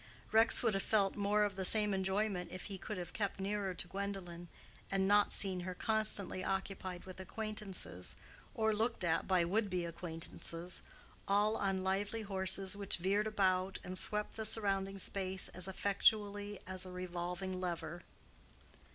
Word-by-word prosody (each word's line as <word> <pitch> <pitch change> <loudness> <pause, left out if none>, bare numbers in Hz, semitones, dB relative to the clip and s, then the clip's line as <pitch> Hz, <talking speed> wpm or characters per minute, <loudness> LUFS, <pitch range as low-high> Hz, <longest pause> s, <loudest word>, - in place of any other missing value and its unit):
Rex 225 +2 +7
would 225 -3 +2
have 195 - +1
felt 200 -2 +2
more 210 +1 +2
of 205 -1 0
the 190 - -3
same 210 +1 +6
enjoyment 190 -1 -1
if 185 - -6
he 195 -2 -6
could 210 +1 -5
have 175 -1 -6
kept 200 -2 -2
nearer 195 -1 -2
to 175 - -3
Gwendolen, 190 -3 -5 0.4
and 195 -1 +1
not 205 +1 +4
seen 190 -2 0
her 180 +1 -5
constantly 215 -3 +2
occupied 190 -2 -3
with 185 0 -10
acquaintances, 195 - -4 0.4
or 220 0 +2
looked 220 -2 -1
at 165 -1 +1
by 185 -3 +3
would 205 +4 0
be 180 -2 -1
acquaintances, 170 +1 -4 0.5
all 205 +2 +3
on 195 -2 -1
lively 205 +4 -1
horses 190 -1 +3
which 200 -1 -1
veered 200 +4 +1
about 190 -2 +1
and 185 - -6
swept 210 +4 +1
the 220 - -2
surrounding 195 -2 +1
space 190 -1 0
as 185 +1 -4
effectually 205 +1 +1
as 185 0 -3
a 185 - -7
revolving 180 +1 -4
lever. 175 -1 -4
195 Hz, 160 wpm, -35 LUFS, 185-205 Hz, 0.5 s, Rex